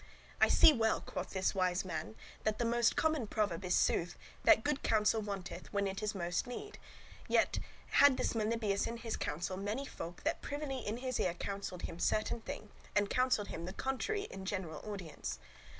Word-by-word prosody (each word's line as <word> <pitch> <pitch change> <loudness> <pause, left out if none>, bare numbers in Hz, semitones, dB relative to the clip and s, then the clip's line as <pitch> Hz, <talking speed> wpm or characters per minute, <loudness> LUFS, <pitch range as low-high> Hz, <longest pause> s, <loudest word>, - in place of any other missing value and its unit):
"I - - +8
see 315 - +8
well," 225 -4 +2
quoth 185 - -5
this 190 -1 0
wise 185 -1 +1
man, 165 -11 -4 0.3
"that 215 -1 +1
the 235 0 +3
common 310 -7 +1
proverb 200 -5 0
is 180 - +2
sooth, 175 +1 +2 0.3
that 220 - +7
good 290 -1 0
counsel 220 0 +3
wanteth, 190 -4 -6
when 200 -1 +1
it 195 +1 -3
is 210 -1 -1
most 175 +4 -1
need." 410 +12 -7 0.5
Yet - - +4
[besides, - - -2 0.3
further] - - +1
had 285 -2 +7
this - - 0
Melibœus 215 -2 0
in 235 - -4
his 230 -1 -3
council 175 +4 -3
many 210 +8 -2
folk, 175 -9 -7
that 320 +3 0
privily 285 -2 -3
in 215 -1 -3
his 255 -1 -2
ear 175 -1 +1
counselled 195 -1 -5
him 165 - -5
certain 215 +5 +1
thing, 215 -1 -7 0.2
and 205 -1 +2
counselled 255 -5 +2
him 165 - -5
the 185 - -5
contrary 400 +11 -1
in 190 - -7
general 185 -6 -3
audience. 160 - -5
210 Hz, 190 wpm, -34 LUFS, 185-240 Hz, 0.5 s, I